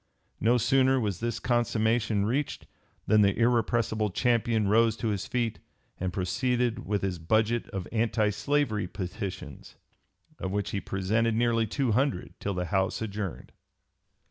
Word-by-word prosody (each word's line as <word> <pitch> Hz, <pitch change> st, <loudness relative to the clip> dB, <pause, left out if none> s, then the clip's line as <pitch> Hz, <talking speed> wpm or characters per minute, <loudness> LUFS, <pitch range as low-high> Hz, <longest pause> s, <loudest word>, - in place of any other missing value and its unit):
No 120 Hz, +3 st, +3 dB
sooner 130 Hz, +3 st, +3 dB
was 105 Hz, -7 st, -2 dB
this 115 Hz, 0 st, -2 dB
consummation 115 Hz, -3 st, +1 dB
reached 135 Hz, +6 st, -2 dB, 0.4 s
than 110 Hz, -1 st, +4 dB
the 100 Hz, -1 st, +3 dB
irrepressible 115 Hz, -2 st, +1 dB
champion 115 Hz, 0 st, +1 dB
rose 115 Hz, +2 st, +3 dB
to 115 Hz, -, -1 dB
his 100 Hz, -3 st, -2 dB
feet 120 Hz, -3 st, -1 dB, 0.4 s
and 95 Hz, 0 st, -2 dB
proceeded 120 Hz, +7 st, -1 dB
with 105 Hz, -1 st, -1 dB
his 95 Hz, -3 st, -2 dB
budget 110 Hz, +7 st, +1 dB
of 95 Hz, -3 st, -5 dB
anti 110 Hz, -2 st, +1 dB
slavery 115 Hz, -5 st, 0 dB
petitions, 95 Hz, +1 st, -6 dB, 0.6 s
of 95 Hz, -, -3 dB
which 100 Hz, +1 st, -2 dB
he 100 Hz, -, -2 dB
"presented 110 Hz, +4 st, 0 dB
nearly 115 Hz, -1 st, +2 dB
two 130 Hz, +2 st, 0 dB
hundred, 115 Hz, -5 st, 0 dB
till 100 Hz, -1 st, -3 dB
the 90 Hz, 0 st, -1 dB
House 95 Hz, +2 st, 0 dB
adjourned." 105 Hz, -4 st, -5 dB
110 Hz, 145 wpm, -28 LUFS, 100-120 Hz, 0.6 s, than